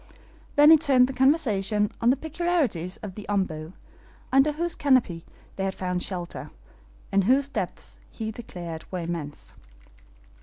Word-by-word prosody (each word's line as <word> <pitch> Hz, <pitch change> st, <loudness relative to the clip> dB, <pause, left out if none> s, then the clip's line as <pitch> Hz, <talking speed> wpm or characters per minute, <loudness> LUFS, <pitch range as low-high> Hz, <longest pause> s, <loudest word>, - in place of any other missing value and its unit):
Then 295 Hz, +2 st, +8 dB
he 320 Hz, -, +9 dB
turned 270 Hz, -5 st, +4 dB
the 265 Hz, -, -5 dB
conversation 215 Hz, -, +2 dB
on 235 Hz, -, +4 dB
the 260 Hz, -, +5 dB
peculiarities 305 Hz, -, -1 dB
of 200 Hz, -3 st, -6 dB
the 210 Hz, +2 st, -9 dB
OMBU, 170 Hz, -5 st, -2 dB, 0.6 s
under 270 Hz, +3 st, +4 dB
whose 340 Hz, +3 st, -1 dB
canopy 255 Hz, -, +1 dB, 0.3 s
they 190 Hz, -, -2 dB
had 195 Hz, 0 st, -2 dB
found 180 Hz, -1 st, -2 dB
shelter, 175 Hz, -8 st, -5 dB, 0.6 s
and 195 Hz, -1 st, +2 dB
whose 270 Hz, +4 st, +3 dB
depths -, -, -5 dB
he 220 Hz, -1 st, -5 dB
declared 175 Hz, -8 st, -8 dB
were 180 Hz, -2 st, -3 dB
immense. 165 Hz, -3 st, -6 dB
210 Hz, 145 wpm, -26 LUFS, 180-275 Hz, 0.6 s, he